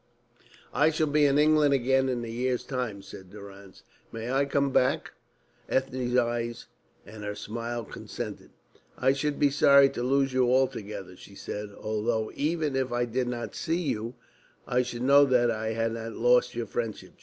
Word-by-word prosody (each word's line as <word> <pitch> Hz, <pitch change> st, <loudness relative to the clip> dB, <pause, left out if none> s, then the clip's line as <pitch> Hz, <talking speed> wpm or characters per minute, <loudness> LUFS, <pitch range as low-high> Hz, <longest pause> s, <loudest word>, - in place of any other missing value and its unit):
"I 150 Hz, +2 st, +4 dB
shall 155 Hz, 0 st, +1 dB
be 150 Hz, 0 st, +3 dB
in 140 Hz, 0 st, +2 dB
England 150 Hz, -1 st, +4 dB
again 135 Hz, +1 st, +2 dB
in 120 Hz, -2 st, -2 dB
a -, -, -7 dB
year's 125 Hz, +2 st, -1 dB
time," 120 Hz, -7 st, -4 dB
said 95 Hz, -1 st, -11 dB
Durrance. 100 Hz, -1 st, -13 dB, 0.3 s
"May 115 Hz, +2 st, -5 dB
I 135 Hz, +1 st, +2 dB
come 140 Hz, 0 st, 0 dB
back?" 125 Hz, -, +1 dB, 0.6 s
Ethne's 130 Hz, -2 st, -1 dB
eyes 120 Hz, -1 st, -1 dB, 0.4 s
and 105 Hz, 0 st, -10 dB
her 105 Hz, 0 st, -4 dB
smile 115 Hz, +2 st, -5 dB
consented. -, -, -7 dB, 0.5 s
"I 135 Hz, -, +3 dB
should 145 Hz, +1 st, -2 dB
be 145 Hz, -1 st, +3 dB
sorry 140 Hz, -1 st, +6 dB
to -, -, -5 dB
lose 135 Hz, +1 st, +1 dB
you 125 Hz, -1 st, +3 dB
altogether," 105 Hz, -8 st, -1 dB
she 100 Hz, -, -14 dB
said, 105 Hz, +1 st, -6 dB
"although 110 Hz, +1 st, -1 dB
even 155 Hz, -1 st, -1 dB
if 130 Hz, -2 st, -1 dB
I 120 Hz, 0 st, 0 dB
did 125 Hz, +1 st, -2 dB
not 120 Hz, -1 st, -4 dB
see 165 Hz, +2 st, -1 dB
you, 115 Hz, -6 st, -3 dB, 0.5 s
I 125 Hz, 0 st, +1 dB
should 120 Hz, -1 st, -5 dB
know 140 Hz, +2 st, +7 dB
that 125 Hz, -3 st, +3 dB
I 110 Hz, +1 st, -2 dB
had 115 Hz, 0 st, -1 dB
not 115 Hz, 0 st, -5 dB
lost 125 Hz, +1 st, +3 dB
your 120 Hz, -1 st, -2 dB
friendship." 115 Hz, 0 st, -5 dB
125 Hz, 175 wpm, -27 LUFS, 115-135 Hz, 0.6 s, know